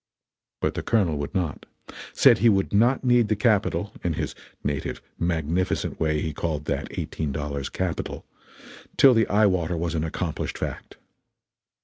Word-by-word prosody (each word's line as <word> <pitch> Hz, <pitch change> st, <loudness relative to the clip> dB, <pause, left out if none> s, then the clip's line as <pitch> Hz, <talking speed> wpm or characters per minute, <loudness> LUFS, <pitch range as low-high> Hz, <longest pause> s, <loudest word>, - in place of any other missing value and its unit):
But -, -, 0 dB
the -, -, -3 dB
Colonel 95 Hz, -9 st, +1 dB
would 70 Hz, +6 st, -5 dB
not; 85 Hz, -6 st, -2 dB, 0.4 s
said -, -, +5 dB
he 115 Hz, +3 st, +5 dB
would 95 Hz, -2 st, +1 dB
not 120 Hz, +7 st, +3 dB
need 120 Hz, -3 st, +4 dB
the 110 Hz, -, +1 dB
capital 105 Hz, -1 st, +1 dB
(in -, -, 0 dB
his -, -, -3 dB, 0.3 s
native 70 Hz, -1 st, -2 dB, 0.2 s
magnificent 85 Hz, +1 st, -1 dB
way 75 Hz, -1 st, +1 dB
he 80 Hz, -, -3 dB
called 75 Hz, -1 st, -3 dB
that 70 Hz, -1 st, -2 dB
eighteen 75 Hz, -3 st, -3 dB
dollars 70 Hz, -1 st, -3 dB
Capital) 90 Hz, -2 st, -3 dB, 0.7 s
till 135 Hz, -2 st, +8 dB
the 115 Hz, -2 st, +3 dB
eye 105 Hz, +1 st, +4 dB
water 90 Hz, -3 st, +1 dB
was 85 Hz, 0 st, -2 dB
an 80 Hz, -2 st, -1 dB
accomplished 80 Hz, 0 st, -3 dB
fact. -, -, -6 dB
85 Hz, 155 wpm, -25 LUFS, 75-105 Hz, 0.7 s, till